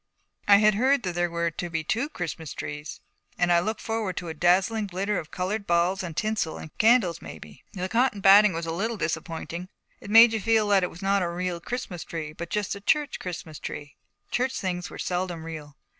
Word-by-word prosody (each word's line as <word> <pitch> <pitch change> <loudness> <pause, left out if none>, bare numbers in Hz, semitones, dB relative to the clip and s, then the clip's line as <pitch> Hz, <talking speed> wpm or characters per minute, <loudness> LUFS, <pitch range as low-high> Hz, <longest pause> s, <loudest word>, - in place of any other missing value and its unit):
I 200 -1 +8
had 215 +1 +5
heard 260 +5 +2
that 180 -2 -2
there 175 0 0
were 170 0 -1
to 175 +2 -5
be 160 -1 -2
two 235 - -1
Christmas 165 - -5
trees, 150 +1 -6 0.4
and 175 0 +2
I 175 - +6
had 170 - +1
looked 220 0 -3
forward 225 -5 -3
to 175 - -4
a - - -4
dazzling 190 +6 +2
glitter 195 +2 -1
of 160 - -9
colored 200 +4 -3
balls 175 +3 +2
and 170 -4 -6
tinsel 215 -7 -1
and 155 - -10
candles, 215 -7 +4
maybe. 75 -2 -11
The 185 -2 -3
cotton 230 0 +1
batting 200 +1 +7
was 165 0 -3
a 165 - -3
little 220 +7 -2
disappointing. 165 +1 -4 0.3
It 205 - -11
made 225 +2 +8
you 220 - -1
feel 225 0 +3
that 200 -1 +5
it 180 - -1
was 175 - -11
not 195 0 +2
a 175 - 0
real 175 0 -3
Christmas 205 -6 -5
tree, 155 -2 -6
but 170 +2 -7
just 210 0 -1
a 200 - -8
church 295 +7 +1
Christmas 165 -4 -7
tree. 145 -1 -7 0.4
Church 260 +2 0
things 180 -2 -3
were - - -10
seldom 175 -2 -3
real. 155 -3 -8
180 Hz, 220 wpm, -26 LUFS, 170-210 Hz, 0.4 s, I